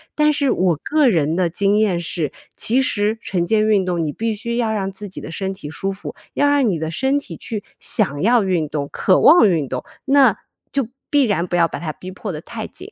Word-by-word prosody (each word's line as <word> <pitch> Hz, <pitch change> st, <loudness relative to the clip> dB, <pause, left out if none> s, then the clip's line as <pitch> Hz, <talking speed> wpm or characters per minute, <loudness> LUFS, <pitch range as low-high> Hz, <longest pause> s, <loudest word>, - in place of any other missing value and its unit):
但 300 Hz, 0 st, +3 dB
是 285 Hz, -2 st, +1 dB
我 180 Hz, -2 st, +2 dB
个 300 Hz, -3 st, +3 dB
人 160 Hz, -4 st, +1 dB
的 180 Hz, -1 st, +2 dB
经 200 Hz, +4 st, +1 dB
验 200 Hz, -5 st, +2 dB
是， 165 Hz, -3 st, -3 dB, 0.2 s
其 250 Hz, +4 st, +2 dB
实 215 Hz, -2 st, 0 dB
晨 175 Hz, -3 st, -1 dB
间 215 Hz, +2 st, +2 dB
运 200 Hz, -4 st, +3 dB
动 175 Hz, -2 st, -1 dB
你 150 Hz, -, -2 dB
必 225 Hz, +7 st, -2 dB
须 235 Hz, +3 st, -3 dB
要 230 Hz, -2 st, 0 dB
让 195 Hz, -2 st, -2 dB
自 205 Hz, +2 st, -8 dB
己 -, -, -9 dB
的 -, -, -8 dB
身 190 Hz, +2 st, -3 dB
体 150 Hz, -6 st, -9 dB
舒 195 Hz, +6 st, -3 dB
服， 195 Hz, +1 st, -8 dB, 0.2 s
要 290 Hz, -, +2 dB
让 285 Hz, -4 st, +3 dB
你 175 Hz, -6 st, 0 dB
的 160 Hz, 0 st, -3 dB
身 265 Hz, -, +1 dB
体 -, -, -10 dB
去 215 Hz, -4 st, -5 dB, 0.2 s
想 145 Hz, -9 st, +2 dB
要 235 Hz, +1 st, +4 dB
运 175 Hz, -5 st, 0 dB
动、 145 Hz, -1 st, -3 dB
渴 185 Hz, -, +2 dB
望 315 Hz, -9 st, +7 dB
运 155 Hz, -6 st, 0 dB
动， 125 Hz, -, -4 dB, 0.2 s
那 275 Hz, -1 st, +5 dB, 0.4 s
就 275 Hz, -5 st, 0 dB, 0.2 s
必 285 Hz, -2 st, +4 dB
然 190 Hz, -6 st, 0 dB
不 175 Hz, -, -2 dB
要 170 Hz, -1 st, +4 dB
把 -, -, -6 dB
它 155 Hz, -3 st, -4 dB
逼 185 Hz, -, -10 dB
迫 195 Hz, +1 st, -6 dB
得 150 Hz, -, -6 dB
太 220 Hz, +4 st, -7 dB
紧。 370 Hz, +7 st, -12 dB
200 Hz, 255 characters per minute, -20 LUFS, 170-235 Hz, 0.4 s, 望